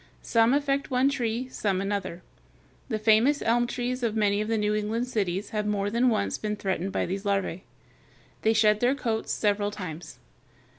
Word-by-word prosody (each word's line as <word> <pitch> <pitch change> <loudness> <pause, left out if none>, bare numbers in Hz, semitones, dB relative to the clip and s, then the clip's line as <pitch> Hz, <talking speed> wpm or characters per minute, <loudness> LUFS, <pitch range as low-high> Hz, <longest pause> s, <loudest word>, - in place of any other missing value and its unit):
Some 230 +2 +3
affect 280 -1 0
one 260 +1 +3
tree, 245 -2 -2
some 200 -6 -1
another. 195 -3 -3 0.7
The 220 - 0
famous 220 +7 +3
elm 240 +1 +2
trees 250 +1 -3
of 230 -3 -1
many 205 -1 +2
of 215 - -3
the 225 0 0
New 210 0 +1
England 215 +3 -1
cities 200 -4 -2
have 210 -1 -1
more 205 -1 -1
than 240 +3 +3
once 100 - -1
been 210 -1 -2
threatened 195 -2 -2
by - - -1
these 195 +2 -4
larvæ. 195 -3 -1 0.8
They 220 - +3
shed 215 -1 +4
their 245 +4 +2
coats 225 -5 -2
several 205 -1 +1
times. 175 -9 -8
215 Hz, 180 wpm, -27 LUFS, 200-240 Hz, 0.8 s, shed